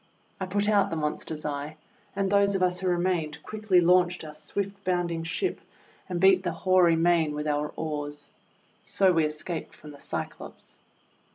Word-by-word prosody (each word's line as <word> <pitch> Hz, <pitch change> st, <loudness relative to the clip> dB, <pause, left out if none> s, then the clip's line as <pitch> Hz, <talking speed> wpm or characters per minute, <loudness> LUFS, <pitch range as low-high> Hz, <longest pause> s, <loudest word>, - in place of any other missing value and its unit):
I 190 Hz, -, -3 dB
put 205 Hz, +2 st, 0 dB
out 205 Hz, -2 st, +3 dB
the -, -, -3 dB
monster's 155 Hz, 0 st, -3 dB
eye; 145 Hz, +1 st, -4 dB, 0.4 s
and 195 Hz, 0 st, 0 dB
those 200 Hz, 0 st, +3 dB
of 185 Hz, -, +1 dB
us 180 Hz, 0 st, +1 dB
who 190 Hz, -, -2 dB
remained 175 Hz, -4 st, 0 dB
quickly 215 Hz, -4 st, +2 dB
launched 180 Hz, 0 st, +3 dB
our 155 Hz, -1 st, -8 dB
swift 200 Hz, +5 st, -4 dB
bounding 175 Hz, -3 st, -1 dB
ship 165 Hz, -, -2 dB, 0.5 s
and 180 Hz, -1 st, -2 dB
beat 190 Hz, 0 st, +5 dB
the 180 Hz, -2 st, -2 dB
hoary 175 Hz, 0 st, +3 dB
main 165 Hz, -2 st, +2 dB
with 150 Hz, 0 st, -3 dB
our 150 Hz, 0 st, -1 dB
oars. 145 Hz, -2 st, -4 dB, 0.5 s
So 190 Hz, -2 st, +3 dB
we 165 Hz, -2 st, +3 dB
escaped 155 Hz, +2 st, -5 dB
from 150 Hz, -, -12 dB
the 145 Hz, -, -13 dB
Cyclops. -, -, -7 dB
175 Hz, 170 wpm, -27 LUFS, 155-185 Hz, 0.5 s, beat